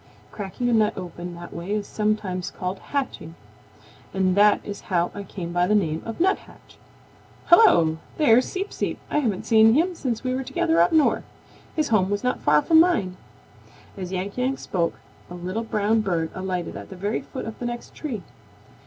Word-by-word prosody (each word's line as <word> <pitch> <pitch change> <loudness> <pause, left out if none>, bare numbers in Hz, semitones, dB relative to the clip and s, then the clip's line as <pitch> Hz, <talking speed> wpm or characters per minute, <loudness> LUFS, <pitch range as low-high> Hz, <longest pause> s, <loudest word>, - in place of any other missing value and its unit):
Cracking 205 +4 -4
a 240 - +2
nut 215 -2 +2
open 175 -1 -7
that 175 0 -10
way 170 +3 -7
is 210 -1 -1
sometimes 210 -5 -1
called 185 +1 -5
hatching, 265 - -4 0.8
and 185 -1 +2
that 205 +1 +5
is 205 -1 -6
how 175 -2 +1
I 205 - -6
come 180 -3 -6
by 175 0 +2
the 210 - +3
name 165 -6 +1
of 225 - -6
Nuthatch. 380 +4 -2 0.7
Hello! 170 - +6 0.2
There's 250 -5 +5
Seep 390 +2 -4
Seep. - - -2
I - - +2
haven't 220 -10 -1
seen 225 0 +6
him 345 +5 +2
since 250 -9 -3
we 255 -1 -1
were 260 - -1
together 165 -9 +1
up 175 - +4
North. 315 -2 +3 0.5
His 310 -2 0
home 195 -4 +3
was 205 0 -1
not 250 0 0
far 150 0 +4
from 320 -1 +5
mine." 310 - +3 0.8
As 185 -2 -6
Yank 190 +5 -3
Yank 260 +2 0
spoke, 170 -5 -1 0.3
a 175 - -8
little 185 +6 -3
brown 220 0 +1
bird 170 -6 -1
alighted 185 -2 -3
at - - -8
the 190 - -9
very 205 +4 -2
foot 265 - -7
of 225 -1 -7
the 240 - -3
next 240 0 -6
tree. 240 - -5
205 Hz, 190 wpm, -24 LUFS, 180-245 Hz, 0.8 s, Hello